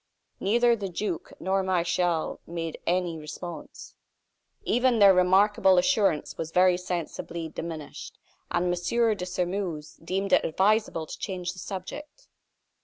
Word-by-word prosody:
Neither 235 Hz, +4 st, +3 dB
the 200 Hz, -4 st, -4 dB
duke 180 Hz, -1 st, -4 dB
nor 195 Hz, +1 st, +1 dB
Martial 175 Hz, -2 st, 0 dB
made 165 Hz, -1 st, -5 dB
any 175 Hz, -2 st, 0 dB
response. 155 Hz, +1 st, -8 dB, 0.7 s
Even 245 Hz, 0 st, +2 dB
their 200 Hz, -2 st, +8 dB
remarkable 190 Hz, +1 st, +4 dB
assurance 195 Hz, -, +2 dB
was 160 Hz, -, -3 dB
very 180 Hz, +1 st, +4 dB
sensibly 170 Hz, -2 st, -4 dB
diminished; 160 Hz, -2 st, -7 dB, 0.3 s
and 175 Hz, +1 st, 0 dB
M. 225 Hz, +6 st, +1 dB
de 180 Hz, -2 st, -5 dB
Sairmeuse 180 Hz, -4 st, -3 dB
deemed 190 Hz, +3 st, -1 dB
it -, -, +5 dB
advisable 195 Hz, -1 st, +1 dB
to -, -, -9 dB
change 185 Hz, -3 st, -4 dB
the 185 Hz, -, -11 dB
subject. 290 Hz, -, -7 dB
180 Hz, 125 wpm, -27 LUFS, 170-200 Hz, 0.7 s, their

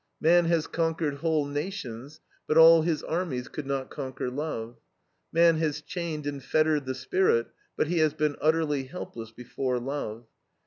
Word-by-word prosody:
Man 170 Hz, +2 st, +5 dB
has 165 Hz, -2 st, +2 dB
conquered 165 Hz, -3 st, -1 dB
whole 160 Hz, -1 st, +1 dB
nations, 145 Hz, -, -5 dB, 0.3 s
but 155 Hz, -, +2 dB
all 165 Hz, 0 st, +9 dB
his 160 Hz, -1 st, -1 dB
armies 160 Hz, -7 st, -2 dB
could 150 Hz, -3 st, -7 dB
not 135 Hz, -1 st, -3 dB
conquer 130 Hz, -2 st, -4 dB
love. 125 Hz, -5 st, -4 dB, 0.5 s
Man 165 Hz, 0 st, +5 dB
has 155 Hz, -2 st, -1 dB
chained 160 Hz, -1 st, -5 dB
and 140 Hz, -2 st, -4 dB
fettered 155 Hz, -1 st, +1 dB
the 130 Hz, -, -2 dB
spirit, 130 Hz, -5 st, +1 dB, 0.3 s
but -, -, +2 dB
he 170 Hz, +2 st, 0 dB
has 155 Hz, -1 st, +2 dB
been 150 Hz, -1 st, 0 dB
utterly 155 Hz, -3 st, +1 dB
helpless 120 Hz, -6 st, -8 dB
before 125 Hz, +2 st, -3 dB
love. 120 Hz, -3 st, -5 dB
150 Hz, 160 wpm, -27 LUFS, 135-165 Hz, 0.5 s, all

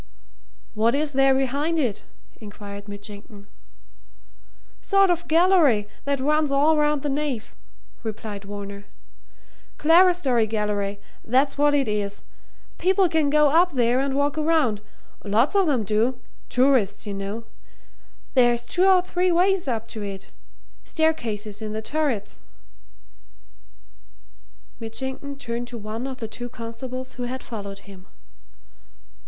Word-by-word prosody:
"What 230 Hz, +3 st, +2 dB
is 295 Hz, 0 st, -1 dB
there 270 Hz, 0 st, +4 dB
behind 280 Hz, +5 st, 0 dB
it?" 245 Hz, -10 st, -1 dB, 0.3 s
inquired 205 Hz, -1 st, -10 dB
Mitchington. 205 Hz, 0 st, -10 dB, 1.4 s
"Sort 395 Hz, -2 st, +4 dB
of 345 Hz, 0 st, -2 dB
gallery, 320 Hz, -, +4 dB, 0.2 s
that 280 Hz, -1 st, 0 dB
runs 300 Hz, +2 st, +1 dB
all 290 Hz, +3 st, +4 dB
round 300 Hz, -1 st, +1 dB
the -, -, -1 dB
nave," 275 Hz, -5 st, -2 dB, 0.5 s
replied 215 Hz, -3 st, -6 dB
Varner. 200 Hz, 0 st, -7 dB, 0.9 s
"Clerestory 325 Hz, -8 st, +4 dB
gallery 205 Hz, -2 st, -2 dB, 0.2 s
that's 265 Hz, +4 st, +2 dB
what 290 Hz, 0 st, +3 dB
it 275 Hz, -3 st, +1 dB
is. 205 Hz, -1 st, -2 dB, 0.6 s
People 375 Hz, +1 st, +3 dB
can 315 Hz, -3 st, +2 dB
go 300 Hz, -1 st, +4 dB
up 345 Hz, +2 st, +4 dB
there 245 Hz, -1 st, +2 dB
and 270 Hz, 0 st, -1 dB
walk 285 Hz, +2 st, 0 dB
around 300 Hz, -10 st, +2 dB, 0.4 s
lots 220 Hz, -, +2 dB
of 390 Hz, -5 st, +3 dB
'em 255 Hz, -6 st, +1 dB
do 220 Hz, +5 st, 0 dB, 0.3 s
tourists, 250 Hz, -7 st, +2 dB
you 205 Hz, -, -4 dB
know. 200 Hz, +3 st, -5 dB, 0.9 s
There's 240 Hz, -2 st, +4 dB
two 360 Hz, +9 st, +2 dB
or 370 Hz, -2 st, +5 dB
three 360 Hz, 0 st, 0 dB
ways 365 Hz, 0 st, +2 dB
up 230 Hz, -3 st, -2 dB
to 220 Hz, -, -6 dB
it 195 Hz, -1 st, -7 dB, 0.5 s
staircases 225 Hz, -10 st, -1 dB
in 215 Hz, -1 st, -4 dB
the 220 Hz, -, -3 dB
turrets." 280 Hz, -7 st, -2 dB, 2.4 s
Mitchington 265 Hz, +5 st, -5 dB
turned 240 Hz, -2 st, -4 dB
to 240 Hz, -, -7 dB
one 220 Hz, +4 st, -5 dB
of 265 Hz, -1 st, -6 dB
the 225 Hz, -, -5 dB
two 245 Hz, +2 st, -7 dB
constables 250 Hz, +3 st, -7 dB
who 245 Hz, -, -5 dB
had 255 Hz, +1 st, -5 dB
followed 200 Hz, -4 st, -8 dB
him. 195 Hz, -2 st, -14 dB
250 Hz, 130 wpm, -24 LUFS, 215-300 Hz, 2.4 s, or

